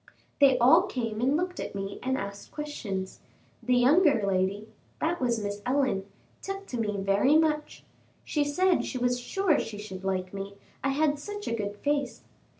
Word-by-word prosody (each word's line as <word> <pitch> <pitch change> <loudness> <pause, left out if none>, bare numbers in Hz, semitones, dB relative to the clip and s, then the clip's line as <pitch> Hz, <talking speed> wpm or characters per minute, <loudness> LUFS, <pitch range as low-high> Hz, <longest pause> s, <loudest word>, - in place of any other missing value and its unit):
They 270 -3 +6
all 320 +10 +6
came 230 - -3
and 270 +4 +3
looked 360 +1 -3
at - - -5
me 195 0 -5
and 260 +1 0
asked 200 0 -6
questions. 210 -11 -5 0.4
The 250 - +2
younger 275 - +4
lady 195 +2 0 0.3
that 335 0 -1
was 240 -2 +1
Miss 205 0 -4
Ellen 250 -7 0 0.3
took 390 0 -5
to 245 - -3
me 210 -2 -1
very 200 +9 +3
much; 305 -1 0 0.4
she 295 - +1
said 360 +6 +2
she 255 - -4
was 245 0 +1
sure 375 +6 +1
she 215 -2 -5
should 195 -3 -8
like 185 -1 -2
me, 200 0 -6 0.3
I 275 - +2
had 290 +1 +1
such 415 +6 -7
a - - -1
good 205 -2 -3
face. 285 -1 -1
250 Hz, 175 wpm, -28 LUFS, 205-300 Hz, 0.4 s, They